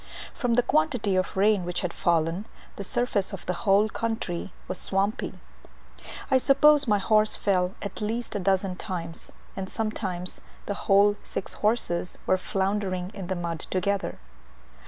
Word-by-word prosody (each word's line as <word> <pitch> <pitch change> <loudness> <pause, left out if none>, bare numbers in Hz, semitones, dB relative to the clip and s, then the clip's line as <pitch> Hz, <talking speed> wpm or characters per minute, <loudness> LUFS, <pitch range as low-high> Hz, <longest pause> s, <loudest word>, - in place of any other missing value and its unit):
From 245 -3 0
the 245 - +4
quantity 250 -10 +1
of 185 +1 -1
rain 205 -1 +4
which 175 0 -2
had 180 -2 -2
fallen, 170 +4 +1 0.3
the 200 - -5
surface 205 -2 0
of 195 - -7
the 180 - 0 0.2
whole 200 +2 +5
country 220 -6 -3 0.2
was 185 - -3
swampy. 195 +2 0 1.0
I 260 - +6
suppose 285 +2 +5
my 210 -2 +4
horse 215 +2 +4
fell 185 -2 +1
at 200 - -6
least 225 +2 -3
a - - 0
dozen 190 -1 +1
times, 170 -4 -1 0.2
and 190 -1 -4
sometimes 190 -5 -3 0.2
the 205 - -2 0.2
whole 205 +1 +5
six - - -5
horses 210 -5 0
were 185 - +3
floundering 190 -2 -1
in 195 -3 -6
the 190 - -1
mud 170 -2 -3
together. 200 +2 -1
195 Hz, 155 wpm, -26 LUFS, 185-215 Hz, 1.0 s, I